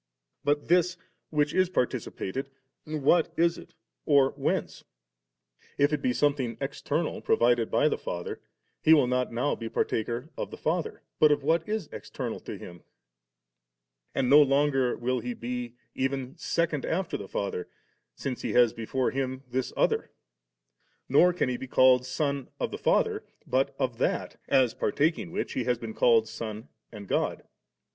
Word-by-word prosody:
But 145 0 +1
this, 180 +1 +3 0.3
which 150 -1 +1
is 185 -1 +3
participated, 135 - -2 0.4
what 155 +2 +2
is 170 0 +2
it - - -15 0.3
or 140 -2 +5
whence^? - - -2 0.9
If 145 +2 +3
it 150 - 0
be 125 - +1
something 130 -4 0
external - - -2
pro - - +2
vided 120 -1 +3
by 150 - +3
the - - 0
Father, 85 0 -5 0.4
He 160 - +7
will 145 -4 +4
not 125 0 0
now 125 +5 0
be 115 -1 -5
partaker 120 +8 -2
of - - -4
the - - -9
Father, 165 +1 -2 0.2
but 155 -1 +6
of 145 -1 +1
what 165 +5 +1
is 215 -6 -2
external - - -5
to - - -7
Him; 85 -1 -11 1.3
and 130 - +1
no 145 +4 +8
longer 135 -2 +2
will 125 +1 -1
He 120 +1 -4
be 120 0 -5 0.2
even 135 0 -2
second 165 -4 -1
afler 180 +1 -2
the 100 - -7
Father, 100 -3 -3 0.5
since 130 -2 -4
He - - -2
has 120 -2 +5
before 125 +3 -1
Him 130 0 -3
this 130 0 -1
other; - - +1 1.0
nor 160 +7 +5
can 175 - 0
He 125 -1 -1
be 130 - -7
called 130 0 +5
Son 140 0 -1
of - - -2
the - - -5
Father, - - +2 0.2
but - - 0
of - - -2
that, - - -1
as 130 -4 +3
partaking 155 +10 0
which 185 - -3
He 125 - -2
has 125 -1 +1
been 115 -1 -7
called 115 -1 +4
Son 110 0 -6 0.2
and 105 -3 -9
God. - - -1
130 Hz, 165 wpm, -28 LUFS, 120-150 Hz, 1.3 s, no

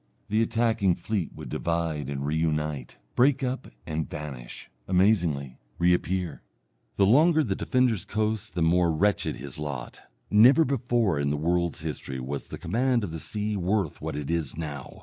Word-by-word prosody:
The 110 +2 +2
attacking 115 -5 +2
fleet 105 -6 -2
would - - -8
divide 80 -4 -2
and 70 -1 -3
re 75 +2 0
unite, 75 -4 -1 0.2
break 135 +2 +4
up 130 +1 -2 0.2
and 80 0 -3
vanish, 70 -5 -7 0.2
amazingly 90 - +2 0.2
reappear. 90 -1 +1 0.5
The 100 - +4
longer 155 - +5
the - - -1
defender's 125 -6 +1
coast 110 0 -2
the 85 - +1
more 85 +1 +3
wretched 100 +6 +1
his 70 +1 -7
lot. 70 -5 -5 0.3
Never 125 +10 +7
before 120 - +1
in 70 0 +1
the 75 - 0
world's 85 +1 0
history 75 -4 -5
was 70 +3 -5
the - - -7
command 120 +6 +1
of 95 - -3
the 80 - -5
sea 105 +4 -2
worth 95 -2 -1
what - - -4
it 75 +1 -3
is 80 -4 -2
now. 75 -5 -6
85 Hz, 165 wpm, -27 LUFS, 75-110 Hz, 0.5 s, Never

